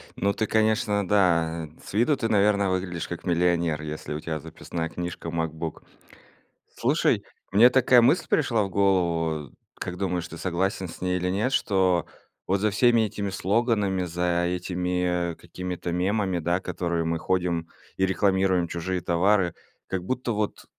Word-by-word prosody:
Ну, 100 +1 +1
ты, 110 - -1
конечно, 110 -2 +1
да, 85 -5 +2 0.2
с - - -10
виду 125 +7 +3
ты, 115 -2 -1
наверно, 100 -2 +3
выглядишь 90 -2 -2
как 85 - -7
миллионер, 85 -3 +1
если 75 0 -5
у 75 - -3
тебя 80 -1 -4
записная 80 +3 -5
книжка 85 0 -5
MacBook. 80 -1 -4 0.9
Слушай, - - +1 0.3
мне 115 +5 +7
такая 125 -1 +5
мысль 125 +9 +3
пришла 115 -8 +2
в 95 - -3
голову. 85 -6 +1 0.2
Как 90 0 -5
думаешь, 90 -4 -2
ты 80 - -9
согласен 95 +2 -1
с 80 - -11
ней 90 0 0
или 90 0 -1
нет, 105 +8 0
что 95 -4 +2 0.4
вот 95 +1 +1
за 105 +1 +2
всеми 120 +2 +4
этими 100 -1 -2
слоганами, 100 -1 +1
за 85 0 0
этими 90 -1 -1
какими-то 90 -1 -6
мемами, 95 +1 0
да, 85 +3 0
которые 85 -2 -2
мы 80 0 0
ходим 90 -3 -1 0.3
и 95 - +3
рекламируем 95 -1 +2
чужие 90 +2 -3
товары, 90 +1 +2 0.3
как 95 -2 -3
будто 125 +2 -2
вот, 105 -1 -3
90 Hz, 155 wpm, -26 LUFS, 85-100 Hz, 0.9 s, мне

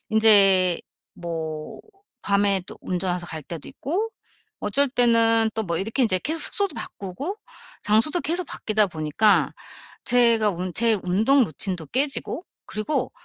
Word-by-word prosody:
인제 195 -5 +5 0.4
뭐 160 -3 -6 0.4
밤에 200 -1 +2
또 - - -10
운전해서 180 -1 -2
갈 160 -2 -7
때도 165 +1 -8
있고 385 +11 -3 0.5
어쩔 265 +6 0
때는 230 -3 +4
또 220 - -1
뭐 170 -4 -2
이렇게 225 +7 -1
인제 185 -6 +2
계속 320 +2 -1
숙소도 400 -6 0
바꾸고 240 - -6 0.5
장소도 230 +11 +2
계속 345 +2 -1
바뀌다 215 -5 0
보니까 160 +6 +2 0.5
제가 235 -3 +3
운 180 0 -4
제 225 -2 +2
운동 225 +9 +3
루틴도 175 0 -6
깨지고 275 - -2 0.2
그리고 215 +8 -2
215 Hz, 270 characters per minute, -23 LUFS, 180-245 Hz, 0.5 s, 인제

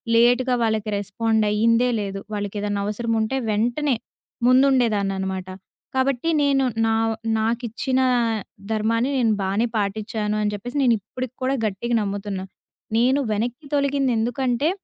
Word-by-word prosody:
లేట్‌గా 245 +2 +4
వాళ్ళకి 220 -1 0
రెస్పాండ్ 220 +2 0
అయ్యిందే 230 +3 +3
లేదు. 195 -1 -4
వాళ్ళకెదన్నా 205 0 -2
అవసరం 230 +3 -2
ఉంటే 220 +5 -1
వెంటనే 240 +6 +1 0.5
ముందుండేదాన్ననమాట. 205 -8 +2 0.5
కాబట్టి 265 +3 +1
నేను 280 -1 +3 0.2
నా 225 - +2 0.4
నాకిచ్చిన 235 +3 -1 0.7
ధర్మాన్ని 230 +3 +1
నేను 235 -3 +3
బానే 195 +4 +1
పాటిచాను 210 +1 -2
అని 210 0 0
జెప్పేసి 245 +7 -5
నేను 245 -3 +5
ఇప్పుడికి 255 +5 -6
కూడా 260 +1 +1
గట్టిగా 215 +4 -1
నమ్ముతున్న. 200 -1 -3 0.6
నేను 255 +4 +3
వెనక్కి 240 +7 -2
తొలగిందెందుకంటే 265 -1 +1
230 Hz, 115 wpm, -23 LUFS, 210-255 Hz, 0.7 s, నేను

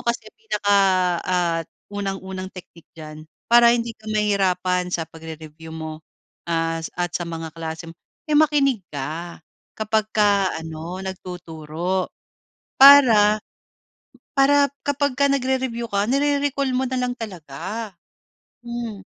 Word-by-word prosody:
kasi, 235 -2 -1
pinaka, 210 - 0 0.5
ah, 175 -2 +1 0.3
unang-unang 195 -2 -4
technique 170 -2 -13
diyan, 155 0 -10 0.2
para 235 0 +7
hindi 235 0 -2
ka 215 - -18
mahirapan 185 -4 +1
sa 165 - 0
pagre-review 160 0 -10
mo, 155 -1 -6 0.5
ah, 165 0 0
at 175 +1 -3
sa 175 - -1
mga 165 -1 -5
klase 165 0 -6
mo, - - -13 0.4
eh 300 - +4
makinig 280 -7 +3
ka 155 +5 -5 0.3
kapagka 210 -2 +1
ano, 160 +3 -6
nagtuturo 180 -1 -4 0.7
para 235 -7 +8 1.0
para 280 +1 +5 0.2
kapagka 285 -1 +1
nagre-review 260 -3 -1
ka, 200 0 +1
nire-recall 280 -1 +1
mo 255 - +1
nalang 250 -1 -1
talaga. 190 +2 -6 0.7
Hmm. 235 -4 -5
195 Hz, 110 wpm, -22 LUFS, 165-240 Hz, 1.0 s, para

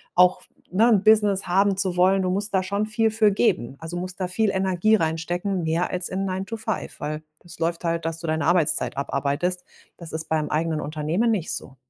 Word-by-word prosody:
auch 180 0 +4
f - - -18 0.2
ne, 220 +6 +4
'n 210 -4 +3
Business 210 -3 +4
haben 195 +2 +2
zu 190 -2 -1
wollen. 190 +2 +3
Du 185 - 0
musst 205 +3 0
da 190 - +2
schon 200 +3 -2
viel 220 0 +1
für 215 -1 +3
geben. 195 - 0
Also, 165 +2 -7
du - - -3
musst 185 +1 -5
da 185 - -1
viel 210 +4 +1
Energie 190 +2 +2
reinstecken 175 +2 -1
mehr 165 +2 0
als 180 0 0
in 190 +1 -2
nine 190 0 -3
to 225 +2 -6
five, 220 -1 -5
weil 150 +1 -4 0.2
das 170 -2 -13
läuft 170 +1 -1
halt, 165 0 -1
dass 165 0 -2
du 170 - -7
deine 155 -1 0
Arbeitszeit 155 -6 +3
abarbeitest. 145 +6 -1 0.3
Das 170 -2 -9
ist 160 0 -4
beim 155 -1 -1
eigenen 155 0 -1
Unternehmen 155 +9 -1
nicht 190 -7 -1
so. 135 - -7
180 Hz, 220 wpm, -24 LUFS, 165-200 Hz, 0.3 s, auch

